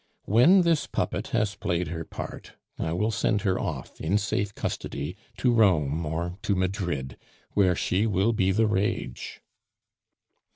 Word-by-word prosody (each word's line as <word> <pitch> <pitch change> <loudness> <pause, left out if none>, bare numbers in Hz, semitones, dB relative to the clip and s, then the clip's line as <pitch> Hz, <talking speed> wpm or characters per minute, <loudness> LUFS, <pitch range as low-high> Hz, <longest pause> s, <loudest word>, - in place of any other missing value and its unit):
When 155 - +6
this 170 -3 +2
puppet - - -2
has 110 -3 0
played 85 -1 -2
her 80 0 -4
part, - - -8 0.3
I 80 - -1
will 105 +7 0
send 105 0 +1
her 95 -3 +1
off 75 -9 -5
in 90 +6 +2
safe 100 -1 -1
custody 70 +6 -4 0.2
to 125 -2 +2
Rome 85 -9 +3
or 85 +4 -3
to 100 - 0
Madrid, 90 - -2 0.3
where 95 -3 +3
she 95 +6 +1
will 100 +2 +2
be 95 -3 +2
the 110 +4 +3
rage." 105 - -2
95 Hz, 150 wpm, -27 LUFS, 85-110 Hz, 0.3 s, When